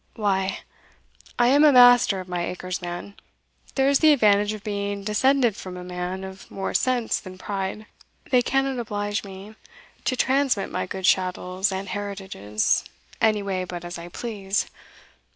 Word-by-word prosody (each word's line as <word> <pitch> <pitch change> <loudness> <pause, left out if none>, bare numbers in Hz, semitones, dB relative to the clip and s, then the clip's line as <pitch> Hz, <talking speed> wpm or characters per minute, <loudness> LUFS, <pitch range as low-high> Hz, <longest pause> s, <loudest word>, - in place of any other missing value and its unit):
Why, 195 -3 0 0.8
I 240 0 +4
am 285 +3 +5
master 245 -8 +7
of 185 - -8
my 175 -1 -2
acres, 180 +1 -4
man 175 +3 -6 0.6
there 270 0 +3
is 280 0 +4
the 310 -1 +6
advantage 210 -5 +3
of 215 -2 -7
being 200 -1 -3
descended 240 +2 +2
from 185 -1 -8
a 180 - -7
man 180 +1 -4
of 190 0 -10
more 195 - -4
sense 250 -3 +1
than 185 -1 -11
pride 195 +2 -4 0.5
they 250 -1 +5
cannot 270 +1 0
oblige 205 -2 -2
me 195 +1 -10 0.5
to 255 - +1
transmit 260 -4 +1
my - - -2
goods 190 0 -2
chattels, 185 +1 +1
and 190 +1 -4
heritages, 190 - -1 0.4
any 215 -2 +3
way 190 -2 -2
but 175 -1 -7
as 175 0 -6
I 170 - -8
please. 205 -1 -2
200 Hz, 155 wpm, -24 LUFS, 185-240 Hz, 0.8 s, master